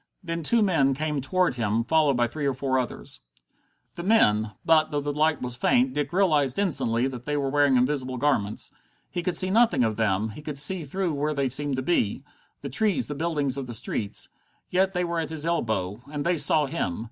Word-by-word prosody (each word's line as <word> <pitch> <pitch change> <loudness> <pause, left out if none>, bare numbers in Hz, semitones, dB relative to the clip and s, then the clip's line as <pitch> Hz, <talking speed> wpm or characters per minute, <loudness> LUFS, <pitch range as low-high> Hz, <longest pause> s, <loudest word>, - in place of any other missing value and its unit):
Then 170 -1 -3
two 225 +8 +2
men 140 -9 +2
came 150 0 -2
toward 180 +1 0
him, 115 0 0
followed 150 -1 +2
by 120 - +3
three 140 +4 -3
or 135 - 0
four 130 0 0
others. 125 - -5 0.7
The - - -7
men 110 - +3
but, 160 -1 +4
though 145 - -1
the 145 0 -3
light 155 -1 +1
was 125 -1 -2
faint, 125 +1 +2
Dick 145 +1 -2
realized 155 -8 +2
instantly 130 - +1
that 125 -2 -5
they 150 0 -1
were 135 -1 -1
wearing 145 -2 +3
invisible 130 0 0
garments. 120 -7 -1 0.4
He 175 - -2
could 175 0 -1
see 185 0 +3
nothing 220 - +4
of 110 -2 -1
them; 110 -1 0
he 110 +8 -10
could 150 -1 -5
see 160 +4 +1
through 180 +3 -2
where 150 +1 -1
they 140 -2 0
seemed 140 +2 0
to 130 - -3
be 130 -9 0 0.4
the - - -5
trees, 205 - +1
the 145 - -5
buildings 145 -3 -1
of 135 -2 -5
the 120 - -4
streets. 105 -1 -3 0.4
Yet 190 +1 +2
they 180 0 0
were 170 -1 -2
at 160 - -3
his 160 -1 -3
elbow. 110 - -1
And 145 -1 -4
they 175 +1 +2
saw 150 0 +4
him. 135 - -3
145 Hz, 215 wpm, -25 LUFS, 125-165 Hz, 0.7 s, but